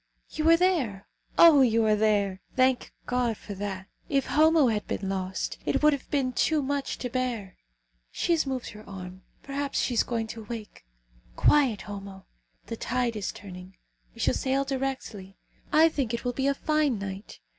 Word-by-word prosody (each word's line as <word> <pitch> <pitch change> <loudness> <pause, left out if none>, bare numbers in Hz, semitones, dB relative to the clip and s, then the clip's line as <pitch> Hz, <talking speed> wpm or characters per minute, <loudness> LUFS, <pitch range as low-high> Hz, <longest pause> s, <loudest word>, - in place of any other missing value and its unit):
"You 315 +1 +1
are 330 - +7
there. 285 - 0 0.3
Oh! 320 -5 +8
you 230 -3 +3
are 215 -1 +4
there! 205 -3 +1
Thank 255 -1 +2
God 245 -3 0
for 205 - -8
that. 195 -1 -5 0.2
If 275 -1 +1
Homo 310 -3 +4
had 210 -2 -2
been 195 - -3
lost, 190 -1 -3
it - - 0
would 300 0 +6
have 280 - -5
been 265 -3 0
too 305 +3 +1
much 280 0 -2
to 250 - -4
bear. 240 -7 -3 0.5
She - - -2
has 325 -4 +2
moved 260 -2 -3
her 210 +1 -11
arm. 185 -1 -8 0.2
Perhaps 280 0 -2
she 250 - 0
is 230 - +4
going 230 -2 -2
to 225 - -9
awake. 215 - -8 0.5
Quiet, 265 - +3
Homo! 195 -2 -9 0.4
The 230 - -6
tide 245 -1 -1
is 205 -3 -3
turning. 185 -1 -11 0.4
We - - -8
shall - - +2
sail 270 +1 0
directly. 260 -8 -4 0.3
I 315 +2 +6
think 265 -7 -1
it 235 - -7
will 245 - 0
be 265 +2 0
a 280 - +2
fine 305 -5 +1
night. 195 +1 -7
240 Hz, 180 wpm, -27 LUFS, 200-275 Hz, 0.5 s, Oh